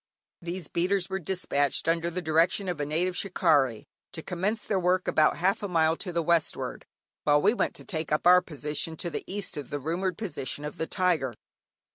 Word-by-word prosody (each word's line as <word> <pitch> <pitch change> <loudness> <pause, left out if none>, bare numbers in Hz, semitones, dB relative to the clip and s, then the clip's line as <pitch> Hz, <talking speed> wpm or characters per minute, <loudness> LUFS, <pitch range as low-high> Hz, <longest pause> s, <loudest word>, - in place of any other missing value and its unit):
These 170 -1 -5
beaters 185 +3 0
were 190 - -1
despatched, 155 -7 0
under 165 +1 +1
the 180 +1 -4
direction 165 +5 +2
of 175 -4 -2
a 145 - -2
native 175 +4 0
"shikarrie," 150 - +2 0.3
to 160 - -6
commence 200 +5 -2
their 195 - 0
work 180 +1 +1
about 155 -1 +3
half 190 +3 +1
a 205 - -2
mile 160 -3 +3
to 185 - -4
the 170 -1 0
westward, 170 -1 0 0.4
while 145 0 +4
we 205 +8 +4
went - - -1
to - - -8
take 160 -4 -4
up 150 - +1
our 180 +1 +8
position 150 0 -4
to 175 - -4
the - - -4
east 200 -4 -3
of 145 -3 -6
the 145 - -2
rumoured 170 +5 -2
position 150 - -4
of 150 - -6
the 160 - -2
tiger. 165 - 0
170 Hz, 200 wpm, -28 LUFS, 155-185 Hz, 0.4 s, our